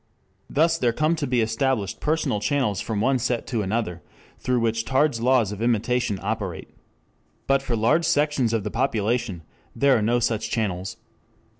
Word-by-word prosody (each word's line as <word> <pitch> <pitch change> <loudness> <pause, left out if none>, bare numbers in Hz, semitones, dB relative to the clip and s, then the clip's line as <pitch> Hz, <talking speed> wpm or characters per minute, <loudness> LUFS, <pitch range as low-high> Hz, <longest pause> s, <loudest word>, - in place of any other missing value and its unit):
Thus 165 +2 +2
there 120 -2 +2
come 155 +5 +1
to 145 -3 -2
be 125 -1 +2
established 110 -2 -1
personal 155 -8 0
channels 120 -5 0
from 110 -3 -2
one 130 +2 +2
set 120 -1 -1
to 115 -4 -2
another, 95 -3 -2 0.4
through 125 -1 0
which 115 0 0
Tarde's 135 -1 +1
laws 120 -4 +3
of 105 +1 -6
imitation 120 -1 +1
operate. 100 -4 -4 0.7
But 135 0 +2
for 125 -3 -2
large 135 +10 +2
sections 145 -6 +1
of 115 -3 0
the 105 - -4
population 115 -6 -1 0.3
there 140 -1 +4
are 110 - +1
no 120 +3 +2
such 110 -2 -1
channels. 95 -5 -2
120 Hz, 165 wpm, -24 LUFS, 110-135 Hz, 0.7 s, there